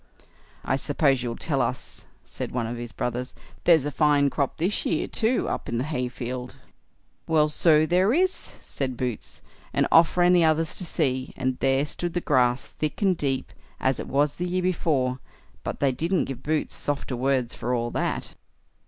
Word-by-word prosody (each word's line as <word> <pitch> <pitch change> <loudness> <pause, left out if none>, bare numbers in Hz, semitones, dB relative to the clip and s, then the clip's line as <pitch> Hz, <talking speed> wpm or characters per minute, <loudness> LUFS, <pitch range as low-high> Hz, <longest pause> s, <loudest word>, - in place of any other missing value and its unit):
"I 130 - +1
suppose 140 -2 +1
you'll 120 -1 -3
tell 140 -1 -1
us", 125 +1 -3 0.2
said - - -5
one 120 -2 -1
of 115 +2 -4
his 120 0 -6
brothers, 125 +1 -3 0.3
"there's 160 -5 +5
a 145 - -2
fine 145 -2 +3
crop 140 -3 -1
this 180 +6 +1
year 160 - 0
too, 230 +3 +1
up - - -3
in 115 - -1
the 120 - 0
hayfield." 125 -3 -4 0.7
"Well, 155 -2 +3
so 155 0 +4
there 180 +5 +3
is", 370 +7 +3
said 130 -3 -5
Boots; 125 -3 -5 0.3
and - - +2
off 165 +2 +5
ran 175 0 +5
the 175 -1 +5
others 160 0 +2
to 185 - 0
see, 130 -5 -1
and 130 -1 -1
there 135 +1 +2
stood 175 +3 -4
the - - +2
grass 125 -6 +2
thick 155 -1 -4
and 190 -2 +4
deep, 135 -4 -2 0.3
as 130 -1 +1
it - - -5
was 145 +2 +1
the 180 - -2
year 180 +1 -1
before; 140 -8 0 0.4
but - - -4
they 140 -2 +3
didn't 165 +7 0
give 135 -2 -6
Boots 155 +1 -1
softer 145 -2 -2
words 130 -1 0
for 125 - -3
all 120 0 -2
that. - - -2
140 Hz, 185 wpm, -25 LUFS, 125-165 Hz, 0.7 s, there's